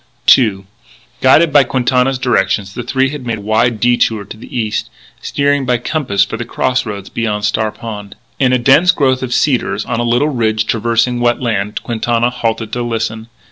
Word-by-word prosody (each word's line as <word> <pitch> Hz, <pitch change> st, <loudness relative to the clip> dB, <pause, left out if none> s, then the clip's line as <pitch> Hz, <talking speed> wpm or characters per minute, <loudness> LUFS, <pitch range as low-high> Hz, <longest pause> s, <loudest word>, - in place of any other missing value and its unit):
II 100 Hz, -6 st, -1 dB, 0.6 s
Guided 150 Hz, +4 st, +4 dB
by 145 Hz, -2 st, +7 dB
Quintana's 130 Hz, +1 st, +1 dB
directions, 100 Hz, -6 st, 0 dB
the 120 Hz, -, -5 dB
three 130 Hz, +2 st, 0 dB
had 145 Hz, -2 st, -7 dB
made 115 Hz, -2 st, -3 dB
a -, -, -9 dB
wide 110 Hz, +2 st, +1 dB
detour 115 Hz, -3 st, +1 dB
to 100 Hz, -, -10 dB
the 115 Hz, +3 st, -9 dB
east, 110 Hz, -2 st, -2 dB, 0.3 s
steering 145 Hz, -1 st, 0 dB
by 125 Hz, -1 st, +1 dB
compass 120 Hz, -5 st, 0 dB
for 115 Hz, -, -6 dB
the 120 Hz, -, -4 dB
cross 125 Hz, +1 st, -1 dB
roads 100 Hz, -2 st, -6 dB
beyond 105 Hz, -3 st, -2 dB
Star 110 Hz, +1 st, 0 dB
Pond. 105 Hz, -4 st, -8 dB, 0.2 s
In 130 Hz, -2 st, +3 dB
a 130 Hz, -, +3 dB
dense 135 Hz, +8 st, +4 dB
growth 130 Hz, -5 st, +1 dB
of 130 Hz, -2 st, -4 dB
cedars, 130 Hz, 0 st, 0 dB
on 120 Hz, -2 st, -2 dB
a -, -, 0 dB
little 120 Hz, +5 st, +1 dB
ridge 110 Hz, -5 st, 0 dB
traversing 115 Hz, +2 st, 0 dB
wet 120 Hz, 0 st, +1 dB
land, 105 Hz, -4 st, -2 dB
Quintana 120 Hz, +1 st, 0 dB
halted 115 Hz, -2 st, -3 dB
to 125 Hz, -, -2 dB
listen. 115 Hz, -1 st, -3 dB
120 Hz, 185 wpm, -15 LUFS, 110-130 Hz, 0.6 s, by